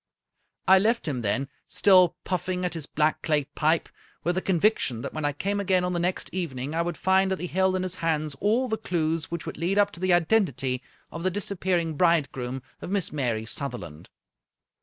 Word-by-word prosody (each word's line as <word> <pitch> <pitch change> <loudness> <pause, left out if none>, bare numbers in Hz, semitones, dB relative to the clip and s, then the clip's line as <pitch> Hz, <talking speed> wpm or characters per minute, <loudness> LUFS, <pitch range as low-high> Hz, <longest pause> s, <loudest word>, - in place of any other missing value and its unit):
I 190 0 +8
left 225 0 +1
him 130 -5 -2
then, 125 +6 0 0.2
still 185 -4 +5
puffing 180 0 -2
at 180 - -2
his 160 -4 -4
black 155 0 +1
clay 150 -3 +1
pipe, 155 +4 0 0.4
with 175 +2 +1
the 185 - -1
conviction 175 - +1
that - - -5
when 155 -1 -3
I 145 - +2
came 200 +8 -2
again 185 -2 +2
on 180 0 -1
the 175 - -1
next 180 +2 -1
even 170 -8 -3
ing 135 +4 -4
I 165 - +1
would 170 -1 -3
find 190 0 +3
that 190 - -1
he - - -3
held 190 +1 +1
in 185 - -1
his 185 0 -3
hands 155 -2 -1
all 230 +6 +2
the 220 -2 -2
clews 160 -2 -1
which 170 -1 -5
would - - -6
lead 180 +4 0
up 205 0 +4
to - - -11
the 185 0 +1
identity 160 - +2 0.3
of 165 - -6
the 185 - +1
disappearing 180 -4 -1
bridegroom 135 -7 +1 0.2
of - - -6
Miss 195 -3 0
Mary 120 -7 -1
Sutherland. 115 - -5
170 Hz, 205 wpm, -26 LUFS, 150-185 Hz, 0.4 s, I